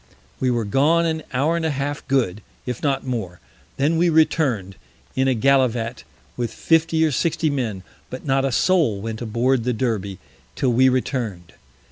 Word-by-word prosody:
We 130 - +1
were 120 -3 0
gone 150 +10 +3
an 160 -1 -1
Hour 145 +6 +1
and 170 - -2
a 160 - +1
half 145 0 -3
good, 115 -7 0 0.2
if 125 -2 -4
not 135 -2 0
more; 110 -9 -4 0.4
then 150 +4 +2
we 175 0 +4
return'd 140 - +1 0.4
in 130 0 +2
a 130 - +2
Gallivat 125 -2 +1 0.3
with 120 -2 -3
50 165 0 +2
or 155 - +1
60 160 +2 0
Men, 115 -9 -3 0.3
but 130 - -8
not 135 -1 +2
a 135 - 0
Soul 150 - +2
went 110 +2 -5
aboard 120 +2 +1
the 125 +1 0
Derby, 105 -5 -2 0.4
till 130 -3 +1
we 130 +2 +5
return'd. 120 -9 -2
130 Hz, 170 wpm, -22 LUFS, 115-145 Hz, 0.4 s, we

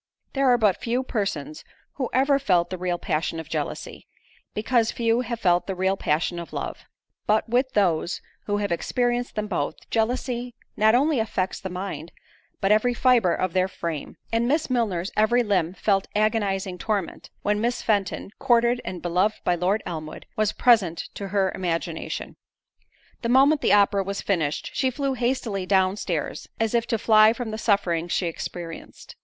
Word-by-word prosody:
There 275 -1 +2
are 245 - +5
but 210 -5 +3
few 245 +2 0
persons 195 - -3 0.3
who 260 -3 -3
ever 275 +2 +3
felt 180 -10 +2
the 185 - -3
real 180 -1 -1
passion 165 0 -2
of 160 - -7
jealousy, - - -5 0.5
because 225 +1 +2
few 230 0 +1
have 235 -1 -4
felt 175 -4 +2
the 190 - -2
real 190 +1 +1
passion 170 0 0
of 170 - -8
love; - - -5 0.4
but 215 +1 +2
with 250 +3 +1
those 175 -4 +1 0.3
who 205 0 +1
have 205 -2 -2
experienced 245 +7 -1
them 210 - -1
both, 175 -8 -3
jealousy 245 +1 -1 0.2
not 220 +2 +4
only 285 +1 +3
affects 190 -4 -1
the 190 - -5
mind, 180 -3 -5 0.5
but 195 - +1
every 240 +3 +3
fibre 235 -9 +4
of 185 -2 -1
their 185 0 +2
frame; 170 -5 -5 0.2
and 230 +1 +2
Miss 300 +1 +1
Milner's 200 -7 0
every 235 +3 +3
limb 185 -5 0
felt 195 0 +1
agonizing 200 -4 0
torment, 205 -6 -3
when 210 0 +1
Miss 240 +1 -1
Fenton, 200 -2 0
courted 240 -1 +3
and 180 -2 -6
beloved 180 +5 +1
by 180 - +2
Lord 185 +5 0
Elmwood, 155 -2 -6
was 215 -1 +1
present 210 -9 +3
to 200 - -5
her 195 -1 +1
imagination. 165 -2 -3 0.8
The 235 - -2
moment 275 +4 +5
the - - +3
opera 200 -1 +4
was 200 +1 -4
finished, 160 -7 -1
she 260 - +1
flew 275 +1 -1
hastily 235 -6 -1
down 190 -1 +3
stairs, 170 -7 -3
as 225 0 0
if 235 -1 +1
to 225 - +1
fly 215 0 +6
from 235 -2 -5
the 220 - -4
sufferings 175 -6 +1
she 185 - +1
experienced. 165 0 -7
205 Hz, 170 wpm, -25 LUFS, 180-235 Hz, 0.8 s, fly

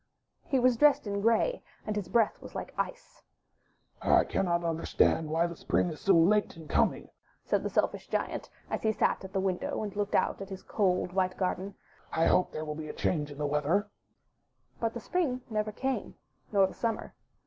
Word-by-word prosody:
He 275 - 0
was 250 -1 +4
dressed 295 0 +5
in 200 -1 -2
grey, 230 - +2 0.2
and 215 - -2
his 205 -4 -2
breath 225 +2 +2
was - - -10
Hke - - -5
ice. - - -5 0.8
'1 - - +5
cannot 170 -2 +1
understand 165 -1 +1
why 165 +2 +2
the 170 0 -4
Spring 175 - 0
is 155 - -9
so 195 -2 +4
late 190 +4 +3
in 160 -2 -10
coming/' - - +1 0.3
said - - +1
the - - -2
Selfish - - 0
Giant, - - -2 0.2
as - - -1
he 220 0 +2
sat - - +1
at 190 - -8
the 195 - 0
window 190 +2 -1
and 205 -2 -5
looked 205 0 -1
out - - +1
at 195 - -6
his 190 -1 -7
cold, 180 -3 0
white 185 -1 0
garden; 190 +1 -2 0.4
'1 165 - +3
hope 180 - +3
there 155 - -4
will 150 - -3
be 155 0 -6
a - - -5
change 150 -4 -1
in 145 - -10
the 150 - -1
weather/' 150 +9 +1 0.9
But 230 0 -1
the - - -3
Spring 265 -3 -1
never 215 0 -1
came, 265 +5 -3 0.4
nor 200 -2 +5
the 190 - -5
Summer. 230 -2 -3
195 Hz, 200 wpm, -30 LUFS, 170-220 Hz, 0.9 s, dressed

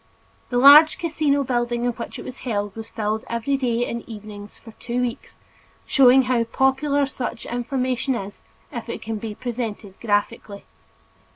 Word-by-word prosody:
The 245 - -1
large 290 +5 +8
casino 300 -4 0
building 240 -2 -1
in 245 - +2
which 235 0 -7
it - - -9
was 255 - -8
held 205 -5 -3
was 225 0 -8
filled 220 0 -2
every 235 +4 -1
day 245 -3 0
and 235 - -4
evening 210 -2 -9
for 225 +2 -15
two 245 0 -3
weeks, 245 -1 -4 0.5
showing 265 -1 +6
how 250 -2 +1
popular 270 +4 +1
such 245 -4 -5
information 255 +1 -1
is, 200 -3 -7 0.3
if - - -6
it - - -5
can 225 0 -4
be 210 0 -6
presented 225 -4 -5
graphically. 205 -1 -2
240 Hz, 160 wpm, -22 LUFS, 225-265 Hz, 0.5 s, large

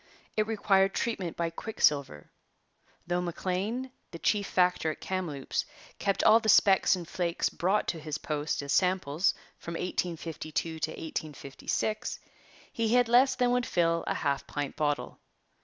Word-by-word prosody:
It 215 0 +1
required 195 -3 +2
treatment 195 -8 -2
by 170 -1 -1
quicksilver. 145 - 0 0.7
Though 175 +1 0
Maclean, 190 +8 -2 0.2
the 170 - -8
chief 205 +4 +1
factor 180 -3 +2
at 155 - -5
Kamloops, 170 -8 -2 0.4
kept 195 -1 0
all 220 +1 +7
the 220 -1 -1
specks 195 -2 +5
and 175 -3 -7
flakes 170 -1 -1
brought 195 +4 0
to 165 - -2
his 155 -1 -4
post 150 -1 -2
as 140 - -2
samples 180 -2 +2 0.2
from 170 - -6
1852 165 -2 -3
to 155 - -1
1856, 160 +7 -3 0.6
he 230 +1 +1
had 245 -2 +4
less 255 +2 +5
than 245 -1 +2
would 245 0 +1
fill 165 -1 +1
a - - 0
half 140 -2 -1
pint 145 -2 -4
bottle. 145 -1 -1
180 Hz, 145 wpm, -29 LUFS, 155-210 Hz, 0.7 s, all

